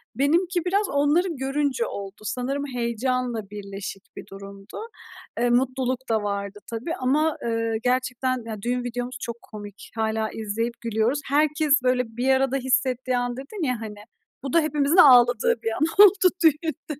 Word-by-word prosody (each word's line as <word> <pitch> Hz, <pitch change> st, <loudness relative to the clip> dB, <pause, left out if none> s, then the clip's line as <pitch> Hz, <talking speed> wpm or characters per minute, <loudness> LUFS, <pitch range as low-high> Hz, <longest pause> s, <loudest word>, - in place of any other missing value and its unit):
Benimki 345 Hz, +6 st, +1 dB
biraz 400 Hz, +3 st, +1 dB
onları 290 Hz, +6 st, +2 dB
görünce 270 Hz, -2 st, 0 dB
oldu 200 Hz, +1 st, -7 dB
sanırım, 255 Hz, +6 st, -2 dB
heyecanla 235 Hz, -2 st, -2 dB
birleşik 200 Hz, -1 st, -7 dB
bir -, -, -9 dB
durumdu. 195 Hz, +1 st, -10 dB, 0.6 s
Eee, 240 Hz, 0 st, +2 dB
mutluluk 255 Hz, +1 st, +1 dB
da 220 Hz, -2 st, +1 dB
vardı 200 Hz, 0 st, -4 dB
tabii 240 Hz, +9 st, -3 dB
ama, 295 Hz, +5 st, +1 dB
ııı, 230 Hz, -1 st, -1 dB
gerçekten, 255 Hz, 0 st, 0 dB
ya, 215 Hz, -3 st, -6 dB
düğün 245 Hz, +2 st, -1 dB
videomuz 245 Hz, +1 st, -4 dB
çok 235 Hz, 0 st, -5 dB
komik, 205 Hz, -2 st, -11 dB
hâlâ 220 Hz, -1 st, -1 dB
izleyip 225 Hz, +2 st, -3 dB
gülüyoruz. 230 Hz, +4 st, 0 dB
Herkes, 300 Hz, +1 st, +2 dB
böyle, 250 Hz, 0 st, +2 dB
"Bir 255 Hz, +2 st, 0 dB
arada 265 Hz, 0 st, +2 dB
hissettiği 255 Hz, -1 st, 0 dB
an." 245 Hz, 0 st, -2 dB
dedin 320 Hz, +8 st, -6 dB
ya, 245 Hz, -3 st, -2 dB
hani, 215 Hz, -1 st, -6 dB, 0.5 s
bu 270 Hz, -, -4 dB
da 335 Hz, -, +6 dB
hepimizin 300 Hz, +1 st, +1 dB
ağladığı 245 Hz, -7 st, +6 dB
bir 225 Hz, -, 0 dB
an 240 Hz, -, -4 dB, 0.2 s
oldu 380 Hz, -2 st, +5 dB
düğünde. 310 Hz, -1 st, 0 dB
250 Hz, 150 wpm, -24 LUFS, 225-280 Hz, 0.6 s, da